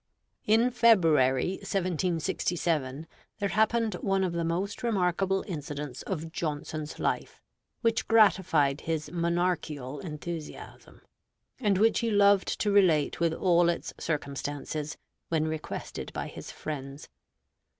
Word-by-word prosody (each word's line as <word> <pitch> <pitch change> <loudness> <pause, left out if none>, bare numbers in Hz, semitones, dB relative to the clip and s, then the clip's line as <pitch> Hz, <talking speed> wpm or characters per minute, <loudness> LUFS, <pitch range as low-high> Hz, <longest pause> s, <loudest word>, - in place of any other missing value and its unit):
In 225 +4 +4
February, 170 - +4
1767, 165 -5 -1 0.3
there 200 -2 -1
happened 220 +1 +2
one 195 -1 +1
of 180 -2 -1
the 170 0 -1
most 180 +5 -2
remarkable 195 -4 +1
incidents 145 -6 -5
of 165 -4 -4
Johnson's 155 -1 -4
life, - - -2 0.4
which 230 -1 +1
gratified 170 -10 +4
his 155 -2 -3
monarchical 170 -5 -1
enthusiasm, 160 0 -8 0.6
and 205 -6 +2
which 220 +3 +4
he 230 - 0
loved 200 -2 +4
to 205 - +2
relate 175 -8 +3
with 170 -1 +2
all 175 -1 +3
its 170 - -3
circumstances, 145 0 -3 0.3
when 160 -1 +1
requested 155 -1 -5
by - - -3
his - - -9
friends. 140 -1 -6
170 Hz, 115 wpm, -28 LUFS, 150-195 Hz, 0.6 s, In